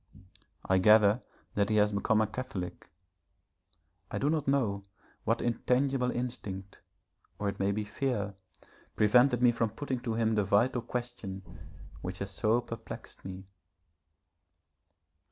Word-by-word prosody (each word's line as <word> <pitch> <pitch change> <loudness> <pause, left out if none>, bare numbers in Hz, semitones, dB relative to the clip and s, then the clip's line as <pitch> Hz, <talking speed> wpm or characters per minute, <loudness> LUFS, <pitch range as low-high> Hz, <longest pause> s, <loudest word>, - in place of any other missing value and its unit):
I 95 0 +4
gather 105 +3 +6 0.3
that 100 0 +1
he 110 - +2
has 105 0 +4
become 105 +2 +2
a - - +3
Catholic. 110 -5 -6 1.2
I - - -3
do 145 +2 +1
not 155 -4 -1
know 115 -8 +1 0.4
what 115 +2 +1
intangible 125 +2 +1
instinct, 105 -7 -5 0.6
or 105 - -1
it 100 - -6
may 100 +1 +2
be 105 +1 -1
fear, 105 -2 -2 0.6
prevented 125 +3 +4
me 120 - +7
from 115 -1 0
putting 130 +3 -3
to 120 -2 -3
him 115 -1 +2
the 105 -1 +2
vital 120 +6 +2
question 120 -5 -5 0.6
which 90 0 -4
has 100 0 -4
so 110 +4 +2
perplexed 115 0 -9
me. 95 0 -7
110 Hz, 135 wpm, -31 LUFS, 100-125 Hz, 1.2 s, me